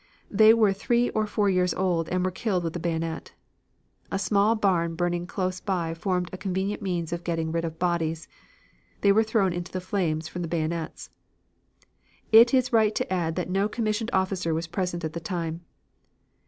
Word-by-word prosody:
They 215 Hz, +2 st, +7 dB
were 220 Hz, -3 st, +4 dB
three 235 Hz, +4 st, +1 dB
or 215 Hz, -1 st, 0 dB
four 210 Hz, -1 st, +1 dB
years 180 Hz, -2 st, +2 dB
old 175 Hz, -4 st, 0 dB
and 185 Hz, 0 st, 0 dB
were 185 Hz, -, 0 dB
killed 190 Hz, -2 st, -1 dB
with 165 Hz, -1 st, -3 dB
the 175 Hz, -, -4 dB
bayonet. 165 Hz, -1 st, -3 dB, 0.8 s
A 195 Hz, -, 0 dB
small 205 Hz, +2 st, +2 dB
barn 175 Hz, -6 st, +1 dB
burning 175 Hz, 0 st, -1 dB
close 185 Hz, -1 st, -2 dB
by 175 Hz, -5 st, -2 dB
formed 180 Hz, +1 st, -2 dB
a 185 Hz, -, -6 dB
convenient 190 Hz, +2 st, -2 dB
means 175 Hz, -4 st, -2 dB
of 170 Hz, 0 st, -4 dB
getting 165 Hz, -2 st, -2 dB
rid 165 Hz, 0 st, -1 dB
of 160 Hz, -1 st, -5 dB
bodies. 165 Hz, -2 st, -1 dB, 0.7 s
They 200 Hz, -, +5 dB
were 215 Hz, +2 st, +5 dB
thrown 220 Hz, -4 st, +1 dB
into 175 Hz, +1 st, -5 dB
the 185 Hz, -, -3 dB
flames 175 Hz, -4 st, -1 dB
from 175 Hz, +2 st, -6 dB
the 170 Hz, -, -3 dB
bayonets. 165 Hz, 0 st, -3 dB, 1.2 s
It 230 Hz, +2 st, +8 dB
is 255 Hz, -1 st, +2 dB
right 215 Hz, -2 st, +4 dB
to -, -, -1 dB
add 165 Hz, -3 st, -1 dB
that 180 Hz, 0 st, -3 dB
no 195 Hz, +2 st, +1 dB
commissioned 220 Hz, 0 st, -1 dB
officer 185 Hz, -3 st, 0 dB
was 165 Hz, +1 st, -2 dB
present 175 Hz, 0 st, -3 dB
at 155 Hz, -, -4 dB
the 170 Hz, -, -4 dB
time. 165 Hz, -1 st, -4 dB
180 Hz, 185 wpm, -26 LUFS, 170-200 Hz, 1.2 s, It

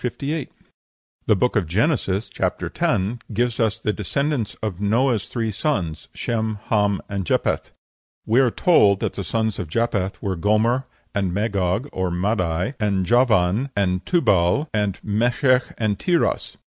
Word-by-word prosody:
58.) 140 Hz, +4 st, -3 dB, 0.8 s
The 105 Hz, -, +5 dB
Book 125 Hz, +6 st, +1 dB
of 100 Hz, -6 st, +1 dB
Genesis 105 Hz, -, 0 dB
(chap. -, -, -2 dB
x.) -, -, 0 dB, 0.3 s
gives 120 Hz, +2 st, 0 dB
us 110 Hz, -3 st, +1 dB
the 105 Hz, -, -1 dB
descendants 135 Hz, -, -2 dB
of 100 Hz, -3 st, -3 dB
Noah's 115 Hz, +1 st, +1 dB
three 115 Hz, -3 st, -2 dB
sons, 95 Hz, -, -2 dB
Shem, 110 Hz, -2 st, -2 dB
Ham, 105 Hz, -3 st, +2 dB
and 100 Hz, -1 st, -3 dB
Japheth. 85 Hz, -, 0 dB, 0.6 s
We 115 Hz, +4 st, +3 dB
are 130 Hz, -2 st, +4 dB
told 105 Hz, -, +4 dB
that -, -, -1 dB
the 100 Hz, -, -4 dB
sons 110 Hz, +3 st, -1 dB
of 90 Hz, -, -4 dB
Japheth 100 Hz, 0 st, -1 dB
were 95 Hz, -1 st, -2 dB
Gomer, 110 Hz, +8 st, +1 dB, 0.3 s
and 95 Hz, -3 st, 0 dB
Magog, 100 Hz, +2 st, 0 dB
and 90 Hz, -2 st, -2 dB
Madai, 90 Hz, -, 0 dB
and 100 Hz, -4 st, +1 dB
Javan, 115 Hz, 0 st, +3 dB
and 90 Hz, -2 st, 0 dB
Tubal, 115 Hz, -, +2 dB
and 105 Hz, -3 st, 0 dB
Meshech, 125 Hz, +5 st, +2 dB
and 105 Hz, -3 st, -1 dB
Tiras. 175 Hz, -2 st, 0 dB
105 Hz, 145 wpm, -22 LUFS, 95-120 Hz, 0.8 s, The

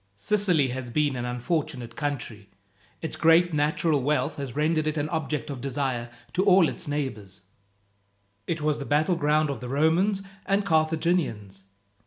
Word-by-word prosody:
"Sicily 175 Hz, -, +2 dB
has 125 Hz, 0 st, -5 dB
been 145 Hz, +1 st, +1 dB
an 120 Hz, -1 st, -3 dB
unfortunate 125 Hz, -1 st, -3 dB
country. 120 Hz, -8 st, -4 dB, 0.5 s
Its 160 Hz, -, -3 dB
great 165 Hz, +1 st, +4 dB
natural 150 Hz, 0 st, +1 dB
wealth 150 Hz, +4 st, 0 dB
has 135 Hz, -4 st, -5 dB
rendered 155 Hz, +1 st, +1 dB
it 155 Hz, 0 st, -1 dB
an 145 Hz, 0 st, 0 dB
object 155 Hz, -2 st, -2 dB
of 130 Hz, -3 st, -6 dB
desire, 130 Hz, -3 st, -2 dB, 0.2 s
to 185 Hz, -, +2 dB
all 190 Hz, -4 st, +6 dB
its -, -, -6 dB
neighbours. 110 Hz, -10 st, -4 dB, 1.1 s
It 165 Hz, -2 st, -2 dB
was 150 Hz, 0 st, 0 dB
the 140 Hz, -, -5 dB
battleground 155 Hz, 0 st, +2 dB
of 140 Hz, -, -5 dB
the 125 Hz, -, -7 dB
Romans 170 Hz, +8 st, +2 dB, 0.2 s
and 200 Hz, 0 st, +1 dB
Carthaginians. 155 Hz, -, 0 dB
150 Hz, 150 wpm, -26 LUFS, 130-160 Hz, 1.1 s, all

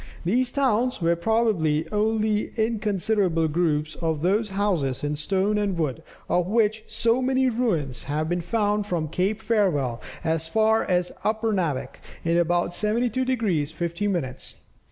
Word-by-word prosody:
These 245 Hz, +7 st, +1 dB
towns 255 Hz, -3 st, +1 dB
were 170 Hz, -1 st, +2 dB
probably 170 Hz, -6 st, +1 dB
only 215 Hz, 0 st, +1 dB
inconsiderable 205 Hz, -6 st, +1 dB
groups 155 Hz, -1 st, 0 dB
of 160 Hz, -2 st, -2 dB
those 210 Hz, +4 st, +2 dB
houses 185 Hz, -11 st, -1 dB
in 145 Hz, 0 st, -1 dB
stone 195 Hz, +7 st, 0 dB
and 200 Hz, -3 st, -1 dB
wood, 145 Hz, -7 st, -1 dB, 0.3 s
of 180 Hz, 0 st, +1 dB
which 220 Hz, 0 st, +1 dB
so 230 Hz, +3 st, +1 dB
many 260 Hz, 0 st, +2 dB
ruins 170 Hz, -, -1 dB
have 150 Hz, +2 st, -1 dB
been 175 Hz, +1 st, -1 dB
found 210 Hz, +3 st, 0 dB
from 165 Hz, -5 st, -2 dB
Cape 200 Hz, +7 st, -1 dB
Farewell, 175 Hz, -, +1 dB, 0.2 s
as 160 Hz, -1 st, 0 dB
far 220 Hz, +4 st, +3 dB
as 180 Hz, -1 st, 0 dB
Upernavik 210 Hz, -, -1 dB, 0.2 s
in 170 Hz, 0 st, +1 dB
about 175 Hz, 0 st, +1 dB
72 230 Hz, +6 st, 0 dB
degrees 205 Hz, -, 0 dB
50 170 Hz, +5 st, -2 dB
minutes. 135 Hz, -10 st, -3 dB
195 Hz, 140 wpm, -25 LUFS, 165-220 Hz, 0.3 s, far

